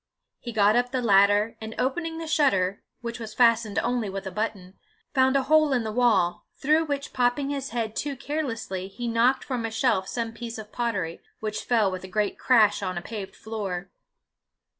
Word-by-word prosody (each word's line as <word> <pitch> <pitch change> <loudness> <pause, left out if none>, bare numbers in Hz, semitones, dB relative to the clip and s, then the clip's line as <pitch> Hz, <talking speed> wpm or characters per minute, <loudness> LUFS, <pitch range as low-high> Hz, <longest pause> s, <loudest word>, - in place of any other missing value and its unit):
He 240 - -6
got 210 -1 +4
up 245 0 +2
the 260 0 -1
ladder, 205 -1 +4
and 220 0 -6
opening 325 +5 -1
the 330 - -5
shutter, 200 -12 +2 0.2
which 235 -1 -5
was 220 -2 -7
fastened 230 -3 +3
only 240 -3 0
with 195 0 -5
a 190 - -4
button, 195 -2 -4 0.3
found 260 -1 +3
a 275 - +3
hole 305 +1 +4
in 245 -3 +1
the 220 - -3
wall, 215 -7 +2
through 310 +3 +3
which 285 -1 -4
popping 255 +3 +1
his 275 -1 -3
head 225 -2 -3
too 285 -1 -2
carelessly, 245 -10 -3
he 240 +5 -6
knocked 235 +3 +2
from 250 -4 -3
a 225 - -1
shelf 220 -4 +1
some 230 -2 -3
piece 230 0 -6
of 215 -1 -9
pottery, 200 -9 -2 0.2
which 215 -1 -3
fell 220 -5 +3
with 185 0 -5
a - - -7
great 205 +2 -1
crash 220 -6 +4
on 185 -2 -3
a - - -2
paved 205 -2 -7
floor. 195 -4 -5
230 Hz, 195 wpm, -26 LUFS, 200-255 Hz, 0.3 s, got